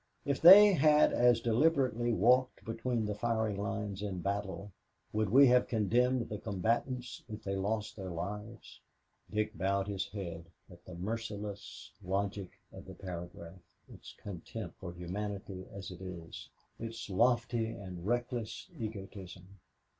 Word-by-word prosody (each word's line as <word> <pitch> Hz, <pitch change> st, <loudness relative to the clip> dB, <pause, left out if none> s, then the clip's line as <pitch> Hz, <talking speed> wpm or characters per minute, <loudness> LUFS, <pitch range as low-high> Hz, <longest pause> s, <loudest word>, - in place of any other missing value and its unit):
If 140 Hz, -1 st, -1 dB
they 200 Hz, +4 st, +10 dB
had 150 Hz, -2 st, +5 dB
as 120 Hz, -1 st, +4 dB
deliberately 120 Hz, -1 st, +2 dB
walked 125 Hz, +5 st, +3 dB
between 115 Hz, 0 st, -1 dB
the 105 Hz, -, -1 dB
firing 110 Hz, -1 st, 0 dB
lines 100 Hz, 0 st, -3 dB
in 100 Hz, -3 st, -3 dB
battle, 100 Hz, +1 st, -3 dB, 0.4 s
would 110 Hz, -1 st, +1 dB
we 135 Hz, +6 st, +8 dB
have 125 Hz, 0 st, +4 dB
condemned 120 Hz, +3 st, +2 dB
the 105 Hz, -, -5 dB
combatants 115 Hz, +5 st, -2 dB
if 110 Hz, 0 st, -7 dB
they 100 Hz, 0 st, -2 dB
lost 105 Hz, +2 st, -2 dB
their 95 Hz, -3 st, -6 dB
lives?" 105 Hz, +6 st, -6 dB, 0.5 s
Dick 105 Hz, 0 st, -1 dB
bowed 100 Hz, +1 st, 0 dB
his 100 Hz, -2 st, -2 dB
head 85 Hz, -5 st, -6 dB, 0.3 s
at -, -, -15 dB
the 90 Hz, -, -9 dB
merciless 105 Hz, +1 st, -5 dB
logic 95 Hz, 0 st, -2 dB, 0.2 s
of -, -, -10 dB
the 95 Hz, -, -10 dB
paragraph, 85 Hz, -1 st, -8 dB, 0.3 s
its -, -, -12 dB
contempt 95 Hz, 0 st, -7 dB
for 90 Hz, -, -6 dB
humanity 95 Hz, +2 st, -5 dB
as 95 Hz, -1 st, -7 dB
it 90 Hz, 0 st, -10 dB
is, 90 Hz, -3 st, -8 dB, 0.3 s
its 115 Hz, 0 st, -6 dB
lofty 120 Hz, +3 st, +2 dB
and 95 Hz, -4 st, -7 dB
reckless 120 Hz, -1 st, -2 dB
egotism. 95 Hz, -3 st, -8 dB
105 Hz, 140 wpm, -33 LUFS, 95-115 Hz, 0.5 s, they